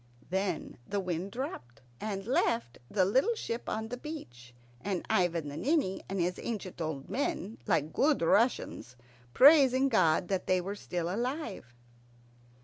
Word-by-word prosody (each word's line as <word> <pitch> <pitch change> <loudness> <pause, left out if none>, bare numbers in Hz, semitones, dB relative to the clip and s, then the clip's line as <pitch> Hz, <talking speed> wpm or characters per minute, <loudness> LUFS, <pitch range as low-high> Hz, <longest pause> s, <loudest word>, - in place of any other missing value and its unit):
Then 190 -7 -2
the 205 - -1
wind 185 0 -3
dropped, 130 - -6 0.2
and 195 -2 -4
left 230 - 0
the 190 -3 +2
little 265 - +2
ship 235 - -4
on 220 +1 -3
the 245 - -4
beach, 120 - -9 0.3
and 190 -2 -2
Ivan 170 -4 +1
the 145 - -6
Ninny 280 - +1
and 195 0 -2
his 180 +1 0
ancient 195 -6 -5
old 155 -4 -3
men, 225 -5 -2
like 155 -1 +1
good 290 - +2
Russians, 200 - +1 0.4
praising 275 -2 +7
God 175 -6 +3
that 190 -2 -1
they 185 0 +3
were 190 +3 -4
still 175 -4 -3
alive. 230 - -3
195 Hz, 145 wpm, -31 LUFS, 170-245 Hz, 0.4 s, praising